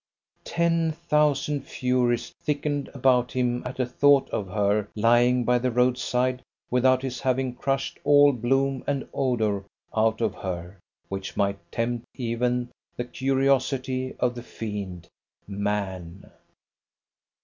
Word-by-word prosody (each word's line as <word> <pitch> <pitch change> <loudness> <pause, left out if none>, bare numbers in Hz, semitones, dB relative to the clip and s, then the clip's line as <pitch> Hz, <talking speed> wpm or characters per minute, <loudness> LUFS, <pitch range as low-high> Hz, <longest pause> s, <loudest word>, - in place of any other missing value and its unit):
Ten 165 -1 +1
thousand 150 -3 +1
Furies 125 -2 0
thickened 145 -1 -1
about 125 -2 +2
him 125 -1 0
at 130 - -8
a 130 - +2
thought 140 +2 +4
of 100 - -2
her 100 +2 +1
lying 120 +3 +4
by 125 +1 +3
the 125 +1 0
road 125 +1 +3
side 125 +1 0 0.3
without 130 +1 +3
his 130 -2 -3
having 130 -1 0
crushed 135 +2 -2
all 145 0 +6
bloom 135 +2 0
and 140 -2 -1
odour 110 -6 0 0.3
out 110 0 +2
of 115 - 0
her 90 0 -6 0.3
which 95 0 -6
might 100 0 +1
tempt 120 0 -2
even 125 0 -1 0.3
the 120 - -3
curiosity 130 0 0
of 125 -1 +1
the 120 - -7
fiend, 100 -7 -6 0.4
man. 100 -3 -4
125 Hz, 125 wpm, -26 LUFS, 110-135 Hz, 0.4 s, all